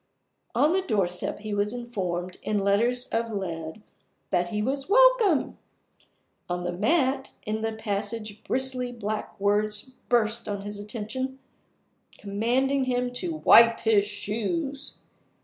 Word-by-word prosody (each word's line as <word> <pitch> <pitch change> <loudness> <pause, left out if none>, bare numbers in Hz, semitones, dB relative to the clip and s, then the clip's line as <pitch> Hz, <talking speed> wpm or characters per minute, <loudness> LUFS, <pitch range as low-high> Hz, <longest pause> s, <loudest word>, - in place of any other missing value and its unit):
On 305 +3 +4
the 380 - +2
doorstep 195 - -1
he 215 -1 -4
was 205 +2 +1
informed, 185 -7 -4
in 215 - -1
letters 230 +6 +2
of 230 0 -1
lead, 170 -1 -5 0.5
that 175 -2 +2
he 210 +4 -3
was 270 - -2
"Welcome!" 470 - +4 0.9
On 175 0 -2
the 175 - -2
mat 265 - +1 0.2
in 215 +1 -2
the 225 0 -1
passage 215 0 -3
bristly 255 -1 -1
black 215 -2 -5
words 210 +4 +1 0.2
burst 230 -1 +1
on 200 -1 -3
his 205 0 -6
attention, 230 +5 -4 0.8
commanding 250 +7 0
him 250 -1 -1
to 325 +6 -2
"wipe 230 0 +7
his 215 -3 +4
shoes." 250 - -3
220 Hz, 130 wpm, -26 LUFS, 205-260 Hz, 0.9 s, wipe